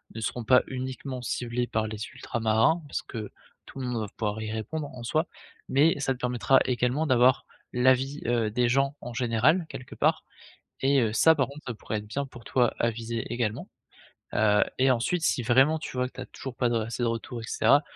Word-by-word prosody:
ne - - -4
seront 120 +2 -3
pas 125 +3 +5
uniquement 130 0 -5
ciblées 120 0 -2
par 110 0 -1
les 105 -1 -6
ultramarins, 115 +9 +1
parce - - -3
que 110 -3 -7 0.3
tout 135 - -10
le 130 - -3
monde 120 -2 -2
va 105 - -3
pouvoir 110 0 -2
y 110 - -4
répondre 140 +8 -4
en 125 - -8
soi, 155 +8 0 0.4
mais, 145 +4 +4
ça 135 - +1
te 125 - -12
permettra, 125 +1 +3
également, 125 +5 0
d'avoir 130 -1 +4 0.3
l'avis, 130 +3 +2
heu, 115 -2 +1
des 120 +2 +2
gens 135 +3 +2
en 120 - -7
général, 125 +9 +2
quelque 130 - -9
part - - +2 0.6
et 135 0 +4
heu, 110 -2 0
ça, 160 +7 +6
par 130 -4 +1
contre, 145 +2 -11
ça 120 - -2
pourrait 110 +1 -4
être 105 - -11
bien 140 +6 -2
pour 120 -3 -13
toi 125 -3 +2
à 115 - +3
viser 115 0 -4
également, 115 -3 -2 0.7
heu 105 0 +4
et 130 +1 +4
ensuite, 130 +8 +1
si 125 - +2
vraiment 135 +7 +4
tu 150 - -7
vois 125 0 +1
que - - -21
tu - - -7
as - - -8
toujours 130 -2 -8
pas 120 - +1
de 120 - 0
r 115 - +1
assez 115 +3 -4
de 120 - +2
retours 115 +1 -4
et - - -9
cetera, 140 +5 +4
125 Hz, 220 wpm, -27 LUFS, 115-135 Hz, 0.7 s, ça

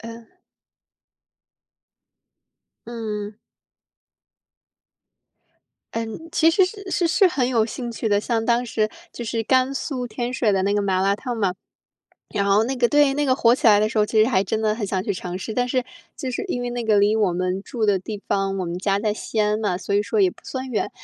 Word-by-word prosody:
呃。 230 +8 -11 2.5
嗯。 215 -3 -5 2.6
嗯， 230 +9 -5
其 325 +1 +4
实 370 +3 +4
是 395 0 -7
是 350 - +1
是 370 +3 +4
很 270 -8 0
有 230 -3 +2
兴 240 +1 -5
趣 225 -1 -2
的， 205 - +3
像 225 +1 -1
当 240 +1 +2
时 215 -2 0 0.2
就 - - -7
是 230 0 -1
甘 260 +3 +2
肃 255 -2 -3
天 240 +2 -4
水 235 -3 +1
的 195 -2 +1
那 200 +1 +1
个 205 - +2
麻 190 -2 +1
辣 195 +1 +3
烫 245 +3 -5
嘛， 200 -5 +1 0.8
然 200 -2 0
后 200 +2 +4
那 260 +3 -2
个 245 -2 +2
对， 290 0 +4
那 290 +1 0
个 255 - +3
火 235 -2 +4
起 250 - -1
来 210 -2 +7
的 215 +1 +1
时 225 - -1
候 210 - +3
其 215 0 +3
实 220 - +3
还 195 -7 +2
真 220 +3 -2
的 215 -1 +2
很 215 -2 -3
想 190 -1 -1
去 205 - 0
尝 180 -1 -5
试。 220 - -5
但 245 +2 0
是 255 -1 0 0.3
就 260 - -4
是 245 - -3
因 245 -8 -2
为 245 - -3
那 240 0 -3
个 220 -2 +2
离 205 +1 +4
我 210 -4 +2
们 185 +2 -1
住 225 +1 -3
的 205 -2 +3
地 205 +2 -7
方， 195 0 0
我 185 - -2
们 170 +1 -4
家 195 +1 +1
在 210 0 0
西 220 +1 -5
安 210 0 +2
嘛， 205 -5 0
所 200 +2 -3
以 205 - +3
说 215 +1 -2
也 190 -3 +4
不 - - -19
算 260 0 -5
远， 225 - -1
220 Hz, 230 characters per minute, -22 LUFS, 205-245 Hz, 2.6 s, 来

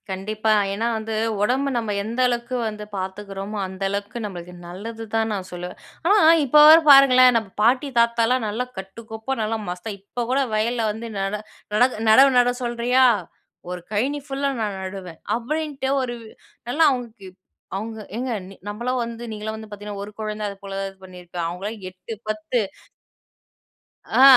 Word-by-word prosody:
கண்டிப்பா. 215 +3 0 0.2
ஏன்னா 225 +4 -1
வந்து, 220 0 -4 0.3
ஒடம்பு 260 +6 +2
நம்ம 225 -3 -1
எந்த 230 +4 -4
அளவுக்கு 240 +1 -2
வந்து 210 -1 -6
பார்த்துக்கிறோமோ, 195 +2 -5
அந்த 190 +1 -10
அளவுக்கு 205 +4 -4
நம்மளுக்கு 180 -3 -7
நல்லது 220 +6 -7
தான் 225 0 +2
நான் 190 -2 -4
சொல்லுவேன், 180 0 -6 0.3
ஆனா - - +7 0.3
இப்போ 295 +3 +6
வர 320 - +11
பாருங்களேன் 255 -3 +8
நம்ம 220 -3 -3
பாட்டி 255 +5 +3
தாத்தாலாம், 235 +1 +3
நல்லா 225 +4 -2
கட்டுக்கோப்பா 220 +6 -5
நல்லா 220 +1 -1
மஸ்தா 180 +5 -5
இப்போ 205 +5 -5
கூட 270 +2 +3
வயல்ல 230 +2 +1
வந்து 225 +2 -6
நட 195 +1 -1 0.4
நட 215 +4 +5 0.3
"நடவு 270 +5 +8
நட 245 0 +5
சொல்றியா? 240 +2 +3 0.6
ஒரு 180 0 -5
கழனி 260 +8 0
ஃபுல்லா 275 0 -1
நான் 205 -3 -2
நடுவேன்" 185 -3 -8 0.2
அப்படின்ட்டு 280 +1 -3
ஒரு, 245 -2 -3 0.5
நல்லா 300 +6 +3
அவங்களுக்கு 235 -6 -5 0.5
அவங்க 220 +3 -5 0.2
ஏங்க 250 +2 -2 0.4
நம்மளாம் 240 +5 -2
வந்து 230 0 -6
"நீங்கள்லாம் 215 0 -4
வந்து 220 0 -9
பார்த்திங்கன்னா, 205 -1 -7
ஒரு 205 - -8
கொழந்தை" 215 0 -3
அது 200 - -8
போல 195 -1 -7
தான் 195 0 -2
இது 195 - -18
பண்ணியிருப்போம் 180 -2 -6
அவங்களலாம் 195 +6 -5
8 185 +5 -9 0.2
10 215 +3 -1 1.6
ஆ - - +7
220 Hz, 155 wpm, -23 LUFS, 200-245 Hz, 1.6 s, வர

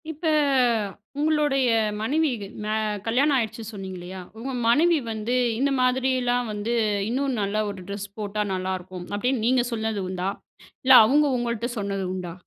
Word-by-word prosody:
இப்ப 320 +1 -4 0.9
உங்களுடைய 295 -3 +2 0.4
மனைவிக்கு 255 -4 0 0.2
மா 215 +1 -1 0.3
கல்யாணம் 275 +5 +3
ஆயிடுச்சுன்னு 225 -1 -3
சொன்னீங்கல்லையா 190 -2 -7 0.2
உங்க 260 +4 -5
மனைவி 325 +8 +4
வந்து 220 +3 -2 0.2
இந்த 280 +1 +2
மாதிரிலாம் 250 -1 +1
வந்து 210 +3 -2 0.4
இன்னும் 265 +1 -1
நல்ல 210 +2 0
ஒரு 200 -2 -7
ட்ரெஸ் 200 0 -5
போட்டா 210 0 -2
நல்லாருக்கும் 185 -1 -4
அப்படின்னு 240 +3 0
நீங்க 250 0 +3
சொன்னது 220 -2 -2
உண்டா, 185 0 -2 0.5
இல்ல 265 0 +6
அவங்க 290 +6 +4
உங்கள்ட்ட 235 -1 -2
சொன்னது 200 -1 -2
உண்டா. 180 -2 -5
230 Hz, 135 wpm, -25 LUFS, 200-260 Hz, 0.9 s, இல்ல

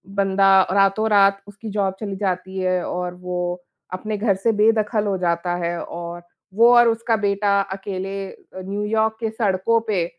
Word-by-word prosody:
बंदा 195 -1 +4
रातों-रात 195 0 +3
उसकी 205 +2 -9
जॉब 195 -2 -1
चली 200 -3 -5
जाती 190 -1 -3
है 185 -1 0
और 180 0 -4
वो 180 0 -4 0.5
अपने 215 +4 -4
घर 205 -1 +1
से 195 +4 +1
बेदखल 215 0 +2
हो 195 -2 0
जाता 175 0 -1
है 170 0 -2
और 170 0 -7 0.3
वो 230 +3 +6
और 240 0 +6
उसका 225 0 0
बेटा 200 -1 +1
अकेले 195 0 -5
अ, - - -13 0.3
न्यू 200 +2 -3
यॉर्क 220 +1 0
के 225 - -1
सड़कों 220 0 +1
पे, 190 -6 0
200 Hz, 165 wpm, -21 LUFS, 185-215 Hz, 0.5 s, वो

